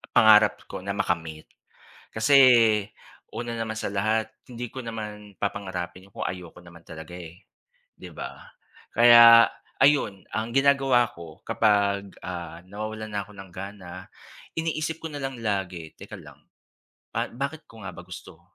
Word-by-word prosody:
pangarap 110 -1 +6
ko - - -6
na 100 +1 -3
makamit 80 -3 -2 0.7
kasi 140 +6 +3 1.0
una 120 -1 -4
naman 110 -1 -3
sa - - -3
lahat 110 +2 0 0.2
hindi 120 0 -6
ko 130 - -5
naman 105 -3 -7
papangarapin 95 -2 -5
kung - - -5
ayoko 90 -2 -6
naman 85 -1 -14
talaga 80 +2 -10 0.8
'di - - -10
ba - - -9 0.4
kaya 115 -1 +9 0.4
ayun 135 -10 +3
ang 110 +2 -2
ginagawa 135 -3 +4
ko 85 -6 -12
kapag, 100 -2 +1 0.2
ah, 85 -2 -6
nawawalan 110 +2 -6
na 100 - -1
ako 105 - -17
ng 95 -1 -10
gana, 95 -1 -9 0.5
iniisip 160 0 -2
ko - - -2
na 145 - -5
lang 135 -2 -4
lagi 95 -6 -3
teka - - -10
lang - - -15 1.0
bakit 140 +3 -4
ko 115 -2 -14
nga 90 - -5
ba - - -9
gusto - - -11
105 Hz, 140 wpm, -25 LUFS, 95-120 Hz, 1.0 s, kaya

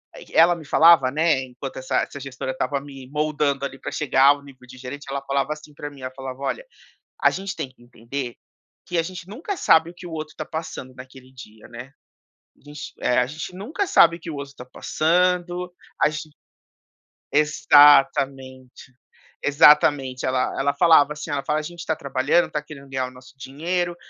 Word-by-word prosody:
eh, - - -12
q - - -19
ela 170 +2 +6
me 165 -2 -11
falava, 160 -3 +6
né 155 -3 +1
enquanto 130 +2 -9
essa 130 0 -2
essa 140 - -8
gestora 130 -1 -5
estava 140 +2 -2
me 135 -2 -11
moldando 150 -2 -1
ali 135 -1 -7
pra - - -6
chegar 135 -3 +2
ao 145 0 +4
nível 130 -2 -16
de 130 +1 -13
gerente, 130 +3 -8
ela 140 0 -3
falava 140 +2 -1
assim 150 -1 -14
pra 145 0 -7
mim, 140 -2 -15
ela 130 0 -5
falava: 130 -1 -7
"Olha, - - -3 0.6
a - - +6
gente 195 0 -5
tem - - -4
que 130 - -24
entender 120 +1 -7 0.5
que 175 - -2
a - - +3
gente 180 +1 -8
nunca 310 - -5
sabe 165 - +4
o - - -15
que 175 +1 -11
o 170 - -9
outro 155 -1 -6
tá 155 - -5
passando 160 -5 -6
naquele 130 0 -13
dia, 110 -4 -14
né? 120 +3 -10 0.7
A - - -29
gente, 145 0 -9
eh, 125 - +1
a 125 - +2
gente 155 +5 -7
nunca 285 - -3
sabe 170 - +5
o - - -24
que 165 - -9
outro 140 -2 -7
tá 125 - -10
passando, 180 +5 0 0.3
a 150 - +5
ge". 155 +1 -7 1.0
Exatamente, 135 -3 +3 0.5
exatamente. 145 -3 +4
Ela 130 0 0
ela 140 +1 +1
falava 150 -2 +5
assim, 150 +1 -8
ela 140 -1 -2
fala: 150 +2 0
"A - - -5
gente 170 +2 -9
tá 160 - 0
trabalhando, 140 +4 +1
tá 150 - -2
querendo 145 -2 -12
ganhar 130 -1 -2
o 125 - -9
nosso 125 +1 -16
dinheiro, 175 +6 -3
145 Hz, 195 wpm, -23 LUFS, 130-160 Hz, 1.0 s, ela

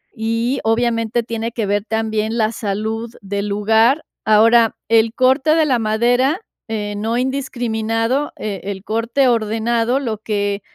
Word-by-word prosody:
y, 230 +3 -1
obviamente, 230 0 +1
tiene 230 0 -4
que 225 -2 -2
ver 205 0 0
también 220 0 -1
la 220 -1 +1
salud 220 +2 -3
del 200 +1 -3
lugar. 220 +7 +2 0.2
Ahora, 225 +1 +5
el 225 0 +3
corte 265 +4 +3
de 320 -1 +3
la 260 -5 +1
madera, 245 - +1 0.3
eh, 210 -2 -3
no 220 +3 -1
indiscriminado, 245 -1 -1
eh, 200 -4 -4
el 195 -1 -5
corte 230 +5 +1
ordenado, 230 +2 +1
lo 225 -6 -3
que 205 -2 -2
225 Hz, 140 wpm, -19 LUFS, 215-240 Hz, 0.3 s, Ahora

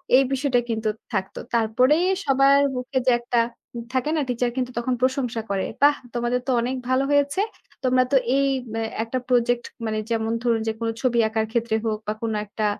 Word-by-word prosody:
এই 270 - +6
বিষয়টা 265 -2 +2
কিন্তু 220 -1 -1 0.2
থাকত। 190 - -2 0.2
তারপরেই 250 +9 +3 0.2
সবার 275 +1 +5
মুখে 250 +1 -3
যে - - +7
একটা 240 0 0 0.4
উম 235 - -5
থাকে 260 +3 0
না, 305 - +1
টিচার 245 0 0
কিন্তু 250 -1 -1
তখন 250 +2 0
প্রশংসা 255 -3 0
করে। 195 -1 0 0.2
"বাহ্! 290 0 +6 0.2
তোমাদের 240 +1 0
তো - - +2
অনেক 250 +2 -1
ভালো 260 +1 +3
হয়েছে। 285 +6 +2 0.4
তোমরা 255 0 +4
তো - - +3 0.2
এই 275 - +3 0.2
উম 220 - -7
অ্যা 225 - -1 0.2
একটা 255 +3 -2
প্রজেক্ট" 245 -1 +2 0.2
মানে 215 0 -1
যেমন 225 -1 0
ধরুন 230 -2 +2
যে 220 - +1
কোনো 230 0 -1
ছবি 240 -3 +2
আঁকার 220 0 -1
ক্ষেত্রে 235 -1 0
হোক 215 -1 -1
বা 210 - 0
কোনো 225 -2 -1
একটা 210 +1 -3
245 Hz, 195 wpm, -23 LUFS, 225-260 Hz, 0.4 s, যে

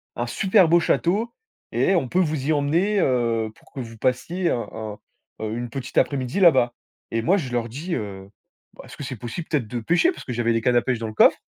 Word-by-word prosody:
un 120 0 -2
super 190 - +3
beau 170 +1 +6
château 205 +7 +1 0.4
et 190 - +2
on 135 -7 +1
peut 180 - +1
vous 155 -6 0
y 155 - +3
emmener, 170 +9 +1
heu, 115 -5 +1
pour - - -23
que - - -7
vous 115 -1 -9
passiez 150 +10 0
un 120 - -2
un, 110 -2 -6 0.4
heu, 110 0 -3
une 120 0 -4
petite 130 +2 -6
après-midi 130 +4 +1
là-bas» 130 -10 +5 0.4
et 115 0 0
moi 185 - +3
je 135 -10 -4
leur 120 -1 -1
dis, 160 +9 -4
heu, 100 -3 -6 0.5
bah: - - -12
«Est-ce - - -12
que - - -6
c'est 130 - -5
possible 120 - -6
peut-être 140 -8 0
de 120 +2 -4
pêcher?» 175 - +3
parce - - -11
que 125 - -4
j'avais 115 0 +1
des 115 - +1
cannes 125 +2 +2
à - - +4
pêche 125 -2 -1
dans 115 - -3
le 110 - -7
coffre. - - +5
130 Hz, 240 wpm, -23 LUFS, 115-170 Hz, 0.5 s, beau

